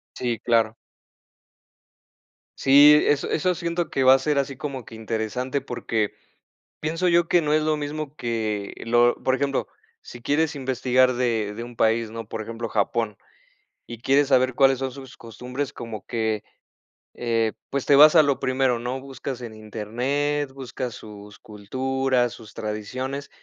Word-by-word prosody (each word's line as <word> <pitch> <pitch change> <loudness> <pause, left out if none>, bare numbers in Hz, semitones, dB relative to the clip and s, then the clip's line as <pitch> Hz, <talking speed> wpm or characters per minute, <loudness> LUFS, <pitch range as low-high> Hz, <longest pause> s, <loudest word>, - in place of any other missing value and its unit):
Sí, 120 -3 -2
claro. 115 -2 +2 1.8
Sí, 145 +2 +7
eso 145 -1 +1
eso 180 +3 +1
siento 170 0 -2
que 135 - 0
va 130 0 +8
a - - +1
ser 145 +1 0
así 135 -1 -1
como 135 -3 -5
que - - -11
interesante, 115 +5 -3
porque 110 -4 -2 0.7
pienso 165 +4 -1
yo 170 -1 +3
que 175 - +3
no 150 -1 0
es 155 0 +3
lo 155 0 +1
mismo, 150 0 -5
que 110 -5 -3
lo 120 +1 +4
por 130 - +2
ejemplo, 140 0 -1 0.3
sí 120 - -11
quieres 150 +5 0
investigar 130 -1 +2
de 115 -4 -1
de 115 - -5
un 120 0 -10
país, 115 0 +1
¿no?, 115 -1 -7
por 110 +1 -5
ejemplo, 115 +1 -6
Japón, 105 0 -1 0.7
y 120 -1 -9
quieres 135 +3 +2
saber 130 -2 +3
cuáles 135 -2 +4
son 135 -1 -2
sus 135 0 -11
costumbres, 125 +4 -6
como 115 -3 -8
que, 110 -3 -2 0.7
eh, 115 -2 0 0.2
pues, 140 -1 -2
te 140 - +5
vas 150 +3 +8
a 160 - +8
lo 140 -2 +1
primero, 130 -2 +1
¿no?, 125 +2 -4
buscas 135 -1 -7
en 115 -2 -7
Internet, 125 +7 -2
buscas 130 -2 -5
sus 105 -1 -12
culturas, 130 +4 -1
sus 110 -1 -13
tradiciones, 130 +6 -5
125 Hz, 160 wpm, -24 LUFS, 115-140 Hz, 1.8 s, va